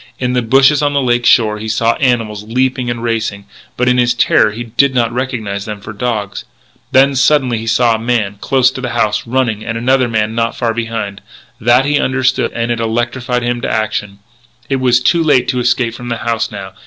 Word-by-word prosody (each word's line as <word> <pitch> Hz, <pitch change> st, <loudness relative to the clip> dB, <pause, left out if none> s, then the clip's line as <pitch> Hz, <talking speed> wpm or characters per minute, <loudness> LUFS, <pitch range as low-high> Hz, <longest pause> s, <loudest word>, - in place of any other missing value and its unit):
In 125 Hz, -1 st, -2 dB
the 125 Hz, -, +1 dB
bushes 135 Hz, +5 st, +4 dB
on 145 Hz, -1 st, +1 dB
the 140 Hz, -, +2 dB
lake 120 Hz, -2 st, +1 dB
shore 105 Hz, -2 st, +3 dB
he 110 Hz, -, -6 dB
saw 115 Hz, +1 st, +1 dB
animals 115 Hz, -5 st, 0 dB
leaping 125 Hz, +2 st, -1 dB
and 120 Hz, -1 st, -4 dB
racing, 110 Hz, -4 st, -2 dB, 0.3 s
but, 125 Hz, -, 0 dB
in 125 Hz, 0 st, +3 dB
his 120 Hz, 0 st, +2 dB
terror, -, -, +3 dB
he 115 Hz, +3 st, -6 dB
did 130 Hz, +4 st, +1 dB
not 115 Hz, -2 st, +1 dB
recognise 110 Hz, -6 st, -3 dB
them 105 Hz, -1 st, -6 dB
for 110 Hz, +2 st, -9 dB
dogs. 105 Hz, -3 st, -3 dB, 0.5 s
Then, 135 Hz, +1 st, +4 dB
suddenly, 130 Hz, -3 st, +2 dB
he 115 Hz, -, -7 dB
saw 115 Hz, +1 st, +3 dB
a 110 Hz, -, -2 dB
man, 115 Hz, -4 st, -1 dB
close 130 Hz, -1 st, +2 dB
to 130 Hz, -, -7 dB
the 120 Hz, -2 st, -4 dB
house, 105 Hz, +2 st, 0 dB
running: 115 Hz, -4 st, -1 dB
and 115 Hz, 0 st, -4 dB
another 130 Hz, +2 st, +2 dB
man 110 Hz, -1 st, -1 dB
not 115 Hz, 0 st, -1 dB
far 115 Hz, -2 st, -1 dB
behind. 115 Hz, -4 st, -4 dB, 0.4 s
That 120 Hz, +3 st, +3 dB
he 145 Hz, 0 st, +1 dB
understood, 130 Hz, -1 st, 0 dB
and 115 Hz, 0 st, -2 dB
it 120 Hz, -, -1 dB
electrified 120 Hz, +2 st, -2 dB
him 120 Hz, 0 st, -1 dB
into 120 Hz, -, -4 dB
action. 105 Hz, -2 st, -2 dB, 0.5 s
It 135 Hz, -, +1 dB
was 125 Hz, -2 st, +3 dB
too 165 Hz, +7 st, +2 dB
late 130 Hz, -5 st, +3 dB
to 125 Hz, -, 0 dB
escape 120 Hz, -1 st, 0 dB
from 120 Hz, +1 st, -8 dB
the 115 Hz, -, -2 dB
house 115 Hz, 0 st, -2 dB
now. 95 Hz, -3 st, -8 dB
120 Hz, 215 wpm, -15 LUFS, 110-125 Hz, 0.5 s, bushes